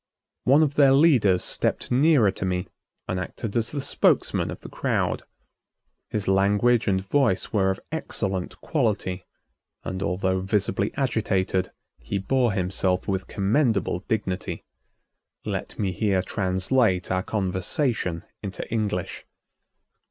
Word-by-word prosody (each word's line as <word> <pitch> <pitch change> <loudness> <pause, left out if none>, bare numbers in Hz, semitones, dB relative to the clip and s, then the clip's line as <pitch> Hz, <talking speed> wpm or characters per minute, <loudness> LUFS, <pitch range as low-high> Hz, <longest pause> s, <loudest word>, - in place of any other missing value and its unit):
One 140 +5 +6
of 145 -2 0
their 140 -2 +5
leaders 130 - +4
stepped - - -1
nearer 130 -5 +4
to 95 - -6
me 90 0 -1 0.4
and 90 - -2
acted 100 +4 -5
as 115 0 +1
the 145 - -3
spokesman - - +2
of - - -7
the - - -9
crowd. - - -1 0.9
His 105 -2 -2
language 105 +5 +3
and 95 -2 +2
voice 120 -6 +1
were 95 -3 +3
of 95 - -1
excellent 95 - -3
quality 105 - -1 0.6
and 95 0 -4
although 95 +1 0
visibly 100 +1 0
agitated, 100 -7 0 0.3
he 65 +10 -3
bore 120 +3 +1
himself 95 -1 0
with 95 -1 -2
commendable 105 - +1
dignity. 95 -4 -2 0.8
Let - - -4
me 100 -3 0
here 95 -1 +1
translate 95 +1 +1
our 95 0 +1
conversation 95 - -1 0.2
into 100 -2 -6
English. 105 -6 -2
100 Hz, 125 wpm, -25 LUFS, 95-120 Hz, 0.9 s, One